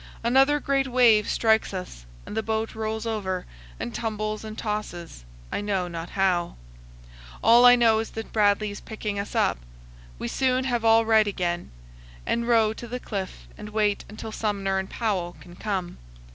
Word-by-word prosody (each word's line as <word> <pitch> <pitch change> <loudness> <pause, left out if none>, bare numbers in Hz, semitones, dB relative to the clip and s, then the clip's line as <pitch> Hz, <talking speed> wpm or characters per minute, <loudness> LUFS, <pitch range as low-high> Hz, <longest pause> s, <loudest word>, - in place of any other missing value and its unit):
Another 270 +5 +4
great 275 -1 0
wave 240 -4 +4
strikes 220 -3 +2
us, 120 - -7 0.2
and - - -7
the 220 - +1
boat 220 0 -2
rolls 220 0 -3
over, 190 -5 -2 0.3
and 120 - -4
tumbles 215 -1 -3
and 215 0 -8
tosses, 175 - -5 0.3
I - - -2
know 195 -3 -1
not 170 -1 -6
how. 185 -3 0 0.9
All 240 +2 +8
I 245 - +9
know 230 -2 +4
is 225 - -3
that 225 - -6
Bradley 210 -1 +2
is 205 - -8
picking 210 -2 -4
us 200 - -5
up. - - +2 0.6
We - - -4
soon 255 - +1
have 240 -3 -1
all 225 0 +5
right 220 -1 +4
again, 175 -3 -2 0.6
and 235 0 -1
row 225 -2 +4
to 240 - -9
the 250 +2 -4
cliff 195 -6 -6
and 210 - -7
wait 210 -1 0
until 215 +1 -7
Sumner 200 -3 -1
and 190 - -5
Powell 190 -7 -2
can 175 0 -14
come. 190 -3 -3
215 Hz, 175 wpm, -25 LUFS, 195-225 Hz, 0.9 s, I